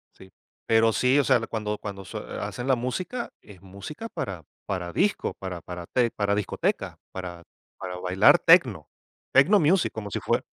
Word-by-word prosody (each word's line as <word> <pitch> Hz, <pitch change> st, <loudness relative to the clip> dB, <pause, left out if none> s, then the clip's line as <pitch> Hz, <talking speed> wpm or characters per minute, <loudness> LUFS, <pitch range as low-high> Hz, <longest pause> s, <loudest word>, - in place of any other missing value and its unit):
Sí. 95 Hz, 0 st, -16 dB, 0.3 s
Pero 115 Hz, 0 st, +4 dB
sí, 130 Hz, +4 st, +3 dB
o -, -, +4 dB
sea, 130 Hz, -2 st, +4 dB
cuando 105 Hz, -1 st, -3 dB
cuando 100 Hz, -2 st, -7 dB
sue -, -, -6 dB, 0.2 s
hacen 125 Hz, +1 st, -5 dB
la 135 Hz, -, +4 dB
música, 180 Hz, -, -3 dB
es 95 Hz, -4 st, -15 dB
música 100 Hz, -, -8 dB
para 95 Hz, -, -5 dB, 0.2 s
para 90 Hz, -3 st, -3 dB
disco, 200 Hz, -, 0 dB
para 90 Hz, -3 st, -7 dB
para 90 Hz, 0 st, -7 dB
te 120 Hz, -2 st, +1 dB
para 100 Hz, -1 st, 0 dB
discoteca, 105 Hz, -1 st, -2 dB
para 90 Hz, -2 st, -7 dB, 0.3 s
para 90 Hz, -1 st, -6 dB
bailar 90 Hz, +1 st, +5 dB
techno, -, -, +4 dB, 0.4 s
techno 180 Hz, +10 st, +6 dB
music, 170 Hz, +4 st, +3 dB
como 105 Hz, -2 st, -6 dB
si -, -, -2 dB
fue -, -, 0 dB
105 Hz, 170 wpm, -26 LUFS, 95-130 Hz, 0.4 s, techno